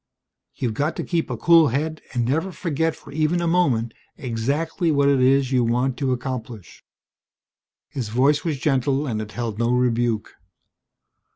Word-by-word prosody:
"You've 120 Hz, -4 st, -2 dB
got 145 Hz, +8 st, -1 dB
to -, -, -3 dB
keep 170 Hz, -2 st, -1 dB
a -, -, -3 dB
cool 165 Hz, -2 st, +5 dB
head 155 Hz, +5 st, -2 dB
and 120 Hz, -2 st, -1 dB
never 160 Hz, +9 st, -1 dB
forget 160 Hz, -1 st, -1 dB
for -, -, -14 dB
even 155 Hz, +4 st, +1 dB
a 170 Hz, -, -1 dB
moment 135 Hz, -10 st, +1 dB, 0.2 s
exactly 140 Hz, -, -1 dB
what 140 Hz, -1 st, +3 dB
it 140 Hz, -2 st, +3 dB
is 135 Hz, 0 st, +3 dB
you 125 Hz, -2 st, +3 dB
want 125 Hz, +3 st, 0 dB
to 135 Hz, -2 st, -1 dB
accomplish." 125 Hz, -5 st, -6 dB, 1.0 s
His 125 Hz, -6 st, -5 dB
voice 135 Hz, +6 st, +2 dB
was 160 Hz, -4 st, -1 dB
gentle, 135 Hz, +1 st, 0 dB
and 110 Hz, -6 st, -2 dB
it 105 Hz, -1 st, -8 dB
held 115 Hz, -3 st, -4 dB
no 115 Hz, 0 st, +1 dB
rebuke. 120 Hz, -3 st, 0 dB
135 Hz, 165 wpm, -22 LUFS, 120-155 Hz, 1.0 s, cool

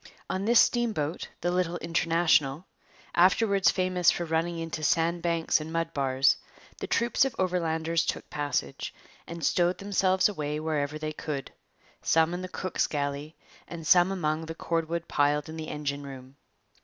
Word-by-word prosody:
On 190 Hz, +1 st, -2 dB
this 235 Hz, +1 st, +5 dB
steamboat, 215 Hz, -11 st, +1 dB
the 175 Hz, -, 0 dB
little 175 Hz, -1 st, 0 dB
International, 165 Hz, -3 st, +1 dB, 0.5 s
afterwards 195 Hz, +3 st, +4 dB
famous 185 Hz, -1 st, +2 dB
for 175 Hz, -, 0 dB
running 165 Hz, +1 st, -1 dB
into 165 Hz, -1 st, -4 dB
sand 165 Hz, +2 st, +1 dB
banks 170 Hz, -2 st, +1 dB
and 155 Hz, +1 st, -7 dB
mud 165 Hz, 0 st, -2 dB
bars, 135 Hz, -1 st, +2 dB, 0.4 s
the -, -, -4 dB
troops 235 Hz, +2 st, +2 dB
of 270 Hz, -3 st, -1 dB
Overlanders 165 Hz, -3 st, 0 dB
took -, -, -3 dB
passage, 145 Hz, -, -3 dB, 0.3 s
and 170 Hz, -1 st, -5 dB
stowed 175 Hz, +1 st, +2 dB
themselves 190 Hz, -2 st, +2 dB
away 150 Hz, -7 st, -3 dB
wherever 155 Hz, -2 st, -2 dB
they 155 Hz, 0 st, -4 dB
could, 145 Hz, -3 st, -5 dB, 0.5 s
some 160 Hz, +1 st, +3 dB
in 175 Hz, -, -3 dB
the 185 Hz, -, -6 dB
cook's 185 Hz, 0 st, -1 dB
galley 145 Hz, +1 st, -3 dB, 0.3 s
and 165 Hz, -2 st, -8 dB
some 175 Hz, +3 st, +5 dB
among 160 Hz, -3 st, -1 dB
the 165 Hz, -, -6 dB
cordwood 165 Hz, 0 st, -2 dB
piled 145 Hz, +1 st, +1 dB
in 160 Hz, -, -7 dB
the 160 Hz, -1 st, -6 dB
engine 145 Hz, -1 st, -3 dB
room. 135 Hz, -1 st, -10 dB
165 Hz, 155 wpm, -28 LUFS, 150-175 Hz, 0.5 s, this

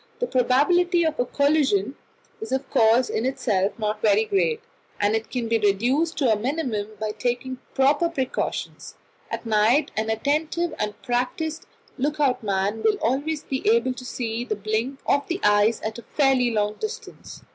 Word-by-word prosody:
The -, -, -1 dB
probability 340 Hz, -, +3 dB
of 315 Hz, -4 st, -1 dB
a 245 Hz, -, +2 dB
collision 280 Hz, -5 st, +1 dB, 0.5 s
is 440 Hz, -, -6 dB
of 265 Hz, 0 st, -1 dB
course 235 Hz, 0 st, +4 dB
in 220 Hz, -, -2 dB
itself 240 Hz, -7 st, 0 dB
not 215 Hz, -1 st, -2 dB
very 215 Hz, 0 st, +3 dB
great, 450 Hz, -, +1 dB, 0.4 s
and 205 Hz, +1 st, +2 dB
it 225 Hz, 0 st, -3 dB
can 245 Hz, -3 st, -3 dB
be 230 Hz, 0 st, +1 dB
reduced 245 Hz, -, +1 dB
to 255 Hz, -6 st, +3 dB
a -, -, +2 dB
minimum 240 Hz, -3 st, -2 dB
by 215 Hz, 0 st, -2 dB
taking 245 Hz, +4 st, -3 dB, 0.2 s
proper 285 Hz, +5 st, +3 dB
precautions. 265 Hz, -6 st, -4 dB, 0.3 s
At -, -, -5 dB
night 225 Hz, +7 st, +3 dB
an 220 Hz, 0 st, -1 dB
attentive 305 Hz, +9 st, 0 dB
and 210 Hz, 0 st, -3 dB
practised 270 Hz, +6 st, -2 dB, 0.3 s
look 295 Hz, +3 st, -1 dB
out 275 Hz, -4 st, +2 dB
man 200 Hz, +1 st, -1 dB
will 430 Hz, -, +3 dB
always 285 Hz, +5 st, -1 dB
be 265 Hz, -1 st, -3 dB
able 235 Hz, +3 st, +3 dB
to 255 Hz, 0 st, -10 dB
see 235 Hz, -2 st, -3 dB
the 225 Hz, -3 st, -2 dB
blink 220 Hz, +6 st, -2 dB
of 285 Hz, 0 st, +1 dB
the 350 Hz, +2 st, -2 dB
ice 210 Hz, +2 st, +4 dB
at 220 Hz, +2 st, -4 dB
a -, -, -13 dB
fairly 265 Hz, -4 st, +4 dB
long 210 Hz, -2 st, -1 dB
distance. 435 Hz, +2 st, -7 dB
250 Hz, 170 wpm, -24 LUFS, 220-285 Hz, 0.5 s, course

